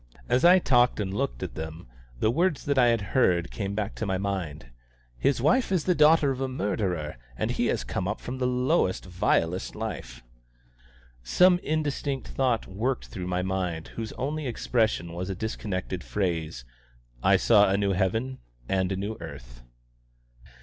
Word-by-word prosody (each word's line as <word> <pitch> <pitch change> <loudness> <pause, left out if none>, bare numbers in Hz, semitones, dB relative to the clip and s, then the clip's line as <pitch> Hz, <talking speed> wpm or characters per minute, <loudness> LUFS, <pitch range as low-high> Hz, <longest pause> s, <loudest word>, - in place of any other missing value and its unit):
As 125 +2 +2
I 180 +2 +8
talked 125 -9 +3
and 95 -2 -2
looked - - -2
at - - -5
them, 80 +2 -7 0.3
the 110 - +2
words 170 +3 +1
that 140 -2 +2
I 125 - +6
had 115 -2 +2
heard 90 -9 +3
came 100 -1 -3
back 105 0 -2
to 110 - -2
my 95 -1 0
mind. 90 -10 -4 0.4
"His 120 - +1
wife 160 - +2
is 180 -5 +2
the 180 - +3
daughter 150 -2 +5
of 130 0 -4
a 135 - 0
murderer, 95 - -2 0.2
and - - -1
he - - 0
has - - 0
come 95 - -3
up 105 - -2
from 130 +1 -6
the 125 - +1
lowest, 125 - +1
vilest 90 -1 0
life." 60 - -6 1.0
Some 180 - +4
indistinct 145 -4 -2
thought 125 -4 0
worked 115 +7 -2
through 90 -1 -5
my 90 0 -1
mind 90 -4 -2
whose 115 -1 -6
only 145 +3 -3
expression 110 -7 0
was 90 +2 -4
a 95 - -2
disconnected 95 -3 -4
phrase: 80 -10 -2 0.6
"I - - +5
saw 105 -3 +5
a 100 - +2
new 100 -1 +1
heaven 110 +8 -1 0.3
and 95 -1 0
a - - 0
new 100 +3 -4
earth." - - -10
105 Hz, 170 wpm, -27 LUFS, 90-130 Hz, 1.0 s, I